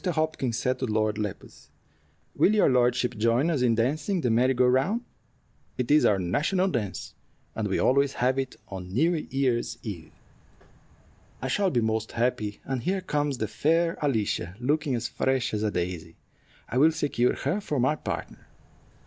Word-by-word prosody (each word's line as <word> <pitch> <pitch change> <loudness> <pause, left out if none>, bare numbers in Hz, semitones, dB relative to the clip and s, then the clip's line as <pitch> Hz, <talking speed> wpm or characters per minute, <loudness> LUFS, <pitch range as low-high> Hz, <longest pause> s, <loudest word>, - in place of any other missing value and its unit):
Hopkins 155 - -1
said 130 +1 -1
to 130 - -1
Lord 110 -1 0
Lepus, 105 -2 -6 0.7
"Will 215 - +4
your 210 - +4
lordship 125 0 +2
join 115 +8 +2
us 145 -6 0
in 120 -2 +3
dancing 155 - 0
the 125 -7 0
merry 125 +3 +3
go 125 +1 +4
round? 135 - +2 0.8
It 125 +1 -1
is 150 - +5
our 100 - +4
national 150 - +1
dance, 115 - -4 0.4
and 110 -2 -1
we 95 - 0
always 140 +1 +3
have 130 +2 +1
it 135 -1 -3
on 95 -2 -7
New 160 - +2 0.2
Year's 130 -3 0
Eve." 90 -8 -7 1.3
"I 130 - -3
shall 195 +7 +2
be 125 -8 +1
most 110 0 -1
happy; 115 -3 -1
and 135 -2 -2
here 190 +5 -1
comes 145 -5 -1
the 110 - -2
fair 165 +6 +1
Alicia, 110 - -1
looking 145 +1 0
as 115 -1 -2
fresh 130 -3 -1
as 105 - -1
a 105 - +1
daisy. 85 -4 -4 0.5
I 125 - -1
will 155 +3 +6
secure 140 -6 0
her 170 +10 -2
for 150 -8 -2
my 130 +5 +2
partner." - - -6
125 Hz, 170 wpm, -27 LUFS, 110-150 Hz, 1.3 s, will